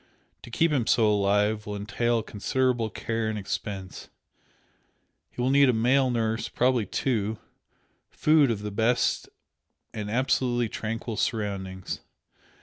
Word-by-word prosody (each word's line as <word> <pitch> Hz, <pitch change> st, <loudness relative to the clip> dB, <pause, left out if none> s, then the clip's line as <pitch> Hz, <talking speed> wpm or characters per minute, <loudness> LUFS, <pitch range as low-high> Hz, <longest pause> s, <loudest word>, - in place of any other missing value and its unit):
To -, -, -11 dB
keep 165 Hz, +7 st, +2 dB
him 130 Hz, -6 st, 0 dB
so 115 Hz, -, +4 dB
alive 105 Hz, +1 st, +1 dB
will 105 Hz, -, -4 dB
entail 110 Hz, +3 st, 0 dB
considerable 120 Hz, +2 st, 0 dB
care 115 Hz, +1 st, -2 dB
and 110 Hz, -, -3 dB
expense. 95 Hz, -1 st, -5 dB, 1.2 s
He -, -, -15 dB
will 125 Hz, +2 st, +2 dB
need 140 Hz, -1 st, +5 dB
a -, -, +4 dB
male 125 Hz, +4 st, +3 dB
nurse 115 Hz, -2 st, -1 dB
probably 125 Hz, -4 st, +1 dB
two 110 Hz, -2 st, -1 dB, 0.7 s
food 150 Hz, -3 st, +3 dB
of 105 Hz, -3 st, -2 dB
the 105 Hz, -, -4 dB
best 115 Hz, +4 st, +1 dB, 0.6 s
and 105 Hz, -1 st, -4 dB
absolutely 120 Hz, 0 st, +1 dB
tranquil 115 Hz, +1 st, -4 dB
surroundings. 95 Hz, -4 st, -3 dB
115 Hz, 130 wpm, -26 LUFS, 105-125 Hz, 1.2 s, need